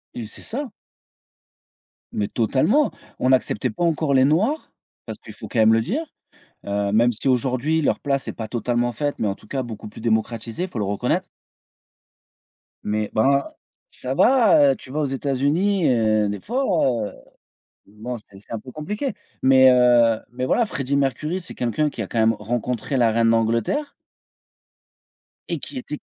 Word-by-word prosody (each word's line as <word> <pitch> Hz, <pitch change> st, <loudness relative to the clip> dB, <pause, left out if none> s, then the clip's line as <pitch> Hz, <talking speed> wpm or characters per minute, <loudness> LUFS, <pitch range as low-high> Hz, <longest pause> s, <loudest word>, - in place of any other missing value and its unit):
Et 115 Hz, -3 st, -5 dB
c'est -, -, -5 dB
ça. 265 Hz, +3 st, -2 dB, 1.4 s
Mais 100 Hz, -1 st, -1 dB
totalement! 140 Hz, -, +2 dB, 0.3 s
On 130 Hz, -, +1 dB
n'acceptait 130 Hz, -1 st, +1 dB
pas 110 Hz, -, -4 dB
encore 160 Hz, -4 st, +1 dB
les 130 Hz, 0 st, +5 dB
noirs, 210 Hz, -, +1 dB, 0.3 s
parce -, -, -6 dB
qu'il -, -, -12 dB
faut -, -, -9 dB
quand 120 Hz, -, -2 dB
même 110 Hz, 0 st, +6 dB
le 115 Hz, -, +3 dB
dire, 250 Hz, -, -2 dB, 0.6 s
heu, 100 Hz, 0 st, -1 dB
même 120 Hz, +3 st, +4 dB
si 115 Hz, +5 st, -1 dB
aujourd'hui 130 Hz, +5 st, +1 dB
leur -, -, +1 dB
place 140 Hz, -2 st, -1 dB
est -, -, -3 dB
pas 110 Hz, -, -6 dB
totalement 120 Hz, +1 st, -1 dB
faite, 145 Hz, +5 st, -2 dB
mais 110 Hz, -, 0 dB
en 95 Hz, -, -1 dB
tout -, -, -19 dB
cas 135 Hz, +3 st, -2 dB
beaucoup 110 Hz, -4 st, -8 dB
plus 110 Hz, -, -12 dB
démocratisée, 115 Hz, +6 st, -1 dB
faut 125 Hz, -, -6 dB
le 105 Hz, -, 0 dB
reconnaître 125 Hz, -, -1 dB, 1.6 s
mais 105 Hz, 0 st, -1 dB
ben 140 Hz, +5 st, +3 dB, 0.5 s
ça 130 Hz, -, -4 dB
va, 195 Hz, -, +5 dB
tu 130 Hz, -, -12 dB
vas 150 Hz, -, -2 dB
aux -, -, +1 dB
États-Unis 145 Hz, +8 st, +1 dB
heu, 110 Hz, -3 st, +2 dB
des 100 Hz, 0 st, -4 dB
fois, 255 Hz, +5 st, -1 dB, 1.2 s
bon, 110 Hz, +5 st, -7 dB
c'est 100 Hz, -2 st, -17 dB
c'est 105 Hz, -, -14 dB
un 115 Hz, -, -2 dB
peu 130 Hz, -, -11 dB
compliqué. 210 Hz, -, -4 dB, 0.3 s
Mais, 130 Hz, 0 st, +7 dB
heu, 120 Hz, -3 st, +4 dB
mais 125 Hz, +1 st, -3 dB
voilà 230 Hz, -, +2 dB
Freddie 140 Hz, -4 st, -2 dB
Mercury 150 Hz, +6 st, -1 dB
c'est 170 Hz, -, -7 dB
quelqu'un 125 Hz, +6 st, 0 dB
qui 115 Hz, -, -5 dB
a -, -, -5 dB
quand 115 Hz, -, -4 dB
même 110 Hz, 0 st, +4 dB
rencontré 120 Hz, +5 st, -3 dB
la 120 Hz, -3 st, +4 dB
reine 115 Hz, 0 st, +3 dB
d'Angleterre 115 Hz, -, 0 dB, 1.6 s
et 170 Hz, -, -2 dB
qui 140 Hz, -, -7 dB
était 150 Hz, +4 st, -5 dB
125 Hz, 170 wpm, -22 LUFS, 115-150 Hz, 1.6 s, Mais